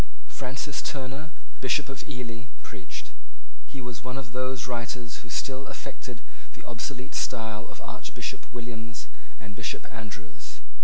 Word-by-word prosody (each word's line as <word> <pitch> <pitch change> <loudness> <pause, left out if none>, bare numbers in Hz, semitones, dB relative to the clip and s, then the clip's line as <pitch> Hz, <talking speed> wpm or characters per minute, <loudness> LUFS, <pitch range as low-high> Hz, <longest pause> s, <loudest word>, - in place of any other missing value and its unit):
Francis 135 +2 +1
Turner, 135 +3 +1 0.3
Bishop 130 - +7
of 135 -3 -1
Ely, 125 -3 -1 0.2
preached. 100 -5 -3 0.6
He 140 -2 -2
was 120 -4 -1
one 125 +1 +1
of 130 -3 -1
those 130 -1 +4
writers 120 -1 +1
who 115 - -8
still 130 +3 +3
affected 120 -1 -3 0.3
the - - -8
obsolete 125 +3 0
style 110 -4 +3
of - - -6
Archbishop - - -1
Williams 115 -2 -1 0.3
and 105 -1 -4
Bishop - - +2
Andrews. 105 -7 -4
120 Hz, 135 wpm, -34 LUFS, 115-130 Hz, 0.6 s, Bishop